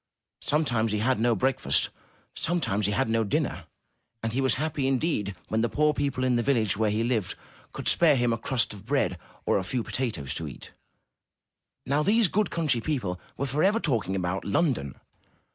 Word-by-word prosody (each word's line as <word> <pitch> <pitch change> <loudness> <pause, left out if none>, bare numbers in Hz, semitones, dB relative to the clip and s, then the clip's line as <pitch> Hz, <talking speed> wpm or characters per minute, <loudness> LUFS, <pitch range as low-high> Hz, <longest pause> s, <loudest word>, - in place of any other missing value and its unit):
Sometimes 120 -8 +1
he - - +1
had 120 +3 +1
no 120 0 +3
breakfast; 130 +6 +1 0.4
sometimes 105 - 0
he - - 0
had 130 +5 +1
no 115 0 +2
dinner; 100 - -1 0.6
and 115 0 -2
he 135 - +1
was 130 - +3
happy 145 -1 -1
in 135 -1 +2
deed 105 - -1
when 110 - +1
the 120 - +1
poor 150 +5 +2
people 140 -3 -1
in 125 -2 +2
the - - +2
village 115 -6 +1
where 110 +1 +1
he 110 +2 0
lived 115 -6 -1 0.4
could - - -6
spare 160 -4 +5
him 120 -2 +2
a - - -1
crust 125 -2 0
of 100 -2 -11
bread 115 -7 0 0.3
or - - +2
a - - -3
few 120 +5 -2
potatoes 90 - -3
to 80 - -4
eat. 70 - -10 1.1
Now, 140 +3 +1
these 210 +4 +3
good 210 +4 +1
country 150 -8 0
people 110 -11 -2 0.2
were 140 - -1
forever 155 - +2
talking 115 - 0
about 95 0 -2
London. 100 - 0
120 Hz, 190 wpm, -27 LUFS, 105-145 Hz, 1.1 s, spare